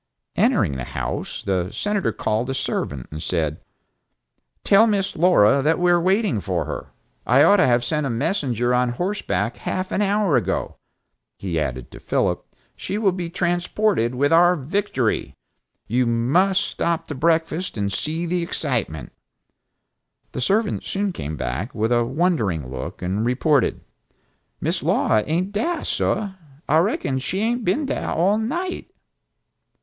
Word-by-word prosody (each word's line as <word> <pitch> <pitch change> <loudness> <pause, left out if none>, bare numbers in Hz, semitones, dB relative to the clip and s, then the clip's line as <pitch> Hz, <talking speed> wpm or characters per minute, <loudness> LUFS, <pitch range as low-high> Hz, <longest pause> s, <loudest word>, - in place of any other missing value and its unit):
Entering - - +3
the 65 - -4
house, - - -4
the 95 -2 -1
Senator 205 -2 -1
called 110 +4 -1
a 135 - -2
servant 70 - -3
and 75 +1 -6
said, 80 -2 -1 1.0
"Tell 210 +3 +6
Miss 195 -3 0
Laura 140 - +5
that 155 +4 +2
we 180 0 +3
are 175 0 +4
waiting 190 - +2
to - - -3
see - - -7
her. - - -2 0.4
I 130 +4 +6
ought 205 - +6
to 185 - +4
have 120 -1 +3
sent 150 -1 0
a - - -2
messenger 120 - 0
on 125 0 +2
horseback 120 - -2
half 185 0 -3
an - - 0
hour 200 -6 +2
ago," 110 - -2 0.6
he 85 -4 -2
added 65 -4 -4
to - - -11
Philip, - - 0 0.3
"she 200 - -4
will 210 -3 +3
be 175 -2 -4
transported 175 - 0
with 145 +4 +2
our 175 +2 +6
victory. 150 - -1 0.5
You 125 +2 +1
must 170 +12 +2
stop 170 -1 -2
to - - -3
breakfast, 160 +2 0
and 100 -1 -1
see 160 - -2
the 175 +1 -1
excitement." 120 - -2 1.2
The - - -4
servant 205 - +1
soon 200 -1 -2
came 75 - -5
back, 85 - -4
with 110 +2 0
a 120 -1 +3
wondering 120 - 0
look 65 +6 -6
and 95 +4 -1
reported, 135 +3 +1 0.8
"Miss - - -1
Laura 110 - +2
ain't 175 +6 0
dah, 310 +11 -1
sah. 205 -2 -1 0.4
I 155 - +4
reckon 150 -7 0
she 185 +10 -2
hain't 240 +2 0
been 245 - +1
dah - - -2
all 195 +6 +2
night!" 345 +11 -3
155 Hz, 155 wpm, -22 LUFS, 115-190 Hz, 1.2 s, Tell